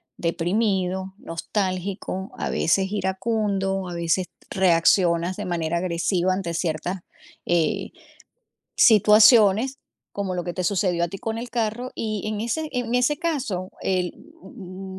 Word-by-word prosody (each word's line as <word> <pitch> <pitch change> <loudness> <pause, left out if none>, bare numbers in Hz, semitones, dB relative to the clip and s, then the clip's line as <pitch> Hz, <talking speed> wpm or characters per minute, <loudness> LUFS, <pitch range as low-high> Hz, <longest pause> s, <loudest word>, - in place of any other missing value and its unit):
deprimido, 190 +2 -1
nostálgico, 190 +2 -3
a - - -2
veces 190 +3 +1
iracundo, 195 -1 -1
a - - -6
veces 170 +2 0
t - - -56 0.2
reaccionas 175 0 +3
de - - -5
manera 170 -1 -1
agresiva 180 +1 0
ante 180 -3 -3
ciertas, 175 +3 -2 0.5
eh, 175 +4 0 0.9
situaciones, 215 +3 +6 0.4
como 195 -2 -2
lo 175 - -3
que 175 - -3
te 185 - -3
sucedió 180 -2 +1
a - - -3
ti 195 - -7
con 225 +2 -3
el 240 +1 -5
carro. 235 +2 -2
Y 215 -3 -3
en 215 -1 -3
ese 305 +7 -2
en 245 -1 -2
ese 255 +4 +2
caso 255 - -2
el 180 -2 0 0.3
u 190 0 -9
190 Hz, 135 wpm, -24 LUFS, 180-215 Hz, 0.9 s, situaciones